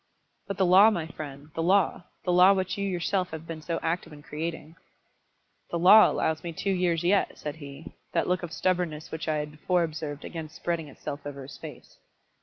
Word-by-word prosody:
"But 200 - -4
the 190 - +3
law, 190 +4 +8
my 175 -7 -2
friend, 145 -2 -9
the 165 - -2
law, 185 0 +2 0.2
the 180 - +1
law 180 +2 +7
which 190 0 -1
you 200 - -3
yourself 185 0 -1
have 160 0 -7
been 165 -1 -7
so 165 +2 -2
active 165 +1 -2
in 145 -1 -12
creating." 160 +1 -5 0.9
"The 170 - -2
law 195 +6 +8
allows 160 0 0
me 170 -1 -5
two 195 +5 -1
years 175 -3 +1
yet," 195 +3 +2
said 150 +1 -6
he; 145 0 -10 0.2
that - - 0
look 180 0 +1
of 175 -2 -6
stubbornness 175 -4 -1
which 160 0 -5
I 155 - +1
had 150 0 -3
before 175 +4 +1
observed 155 -2 -5
again 160 -2 -6
spreading 165 0 -3
itself 145 +1 -7
over 140 -1 -7
his 135 - -11
face. - - -11
165 Hz, 205 wpm, -27 LUFS, 155-180 Hz, 0.9 s, law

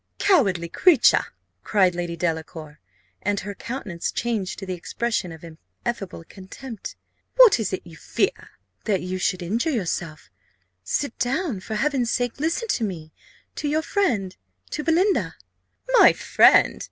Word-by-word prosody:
"Cowardly 200 - +2
creature!" 350 - +4 0.4
cried 190 -4 +3
Lady 175 -1 -4
Delacour, 160 -2 -4 0.4
and 205 0 0
her 205 +1 -6
countenance 205 -7 -5
changed 220 -6 -2
to 195 - -7
the 185 - -3
expression 205 +2 -3
of 160 +1 -11
ineffable 180 +4 -7
contempt; 200 +6 -9 0.4
"what - - +7
is 220 - -1
it 185 - -4
you 170 -2 -12
fear?" - - -2 0.4
"That 195 -4 0
you 185 +1 -3
should 180 +1 -1
injure 225 - -1
yourself. 175 - -3 0.5
Sit 245 - -2
down 260 - -1
for 215 +3 -6
Heaven's 260 -1 0
sake 245 +1 -1
listen 330 - -1
to 235 - 0
me, 165 -7 -5 0.4
to 300 - -4
your 310 +2 0
friend, 225 - 0 0.4
to 300 - -3
Belinda!" 360 +5 +1 0.6
"My - - +8
friend! - - +4
205 Hz, 140 wpm, -23 LUFS, 175-270 Hz, 0.6 s, My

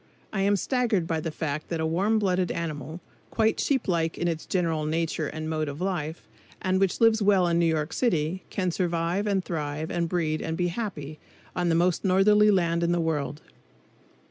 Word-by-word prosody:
I 195 - 0
am 200 +1 +3
staggered 230 -4 0
by 165 -1 -1
the 160 - -3
fact 155 -1 -4
that 165 - -2
a 160 - 0
warm 190 +7 +1
blooded 185 -3 +1
animal, 160 0 -5 0.3
quite 220 -1 +1
sheep 265 -4 0
like 165 -3 0
in 175 - -1
its 165 -2 -3
general 165 -4 0
nature 160 -1 -1
and 155 +1 -5
mode 155 -1 -1
of 140 +1 -7
life, 175 -4 -3 0.3
and 185 0 +1
which 195 -2 +1
lives 225 -1 +4
well 195 -3 +4
in 170 0 +2
New 170 - +3
York 155 -1 -1
City, 180 -6 0
can 185 -2 -1
survive 175 +3 -1
and 195 -2 0
thrive 155 -1 -3
and 170 -1 -1
breed 160 -3 0
and 160 0 -3
be 175 0 +1
happy 165 -8 -5 0.4
on 175 -1 0
the 165 - +3
most 175 +1 +2
northerly 210 +2 +5
land 170 -4 +2
in 170 0 +2
the 175 - +1
world. 150 -3 -2
170 Hz, 195 wpm, -26 LUFS, 160-190 Hz, 0.4 s, northerly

